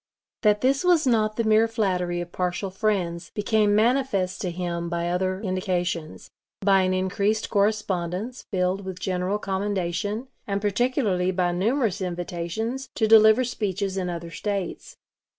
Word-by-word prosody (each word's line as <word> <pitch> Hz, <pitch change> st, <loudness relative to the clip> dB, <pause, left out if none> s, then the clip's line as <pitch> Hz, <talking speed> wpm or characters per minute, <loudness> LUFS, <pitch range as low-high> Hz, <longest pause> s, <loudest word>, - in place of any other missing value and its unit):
That 210 Hz, -1 st, +3 dB
this 270 Hz, +4 st, +2 dB
was 350 Hz, -4 st, +4 dB
not 215 Hz, -4 st, +2 dB
the 230 Hz, -, 0 dB
mere 220 Hz, +1 st, +4 dB
flattery 180 Hz, -6 st, -1 dB
of 175 Hz, 0 st, -7 dB
partial 180 Hz, +1 st, -2 dB
friends 185 Hz, -4 st, -1 dB
became 210 Hz, 0 st, +2 dB
manifest 220 Hz, -5 st, +1 dB
to 185 Hz, -, -1 dB
him 170 Hz, -1 st, -3 dB
by 170 Hz, 0 st, -2 dB
other 185 Hz, +1 st, -1 dB
indications; 180 Hz, -4 st, -3 dB, 0.3 s
by 195 Hz, -1 st, +4 dB
an 185 Hz, 0 st, +1 dB
increased 200 Hz, +3 st, 0 dB
correspondence 205 Hz, +1 st, -1 dB
filled 185 Hz, 0 st, 0 dB
with 190 Hz, -1 st, -6 dB
general 185 Hz, +2 st, -1 dB
commendation, 200 Hz, +3 st, -2 dB, 0.2 s
and 200 Hz, -1 st, -1 dB
particularly 205 Hz, -3 st, +1 dB
by 180 Hz, -1 st, +1 dB
numerous 215 Hz, +2 st, 0 dB
invitations 180 Hz, +8 st, -3 dB
to 220 Hz, -, +2 dB
deliver 220 Hz, +2 st, +7 dB
speeches 200 Hz, -5 st, -2 dB
in 185 Hz, -2 st, -2 dB
other 170 Hz, -1 st, -5 dB
States. 200 Hz, -1 st, -4 dB
195 Hz, 140 wpm, -25 LUFS, 180-220 Hz, 0.3 s, deliver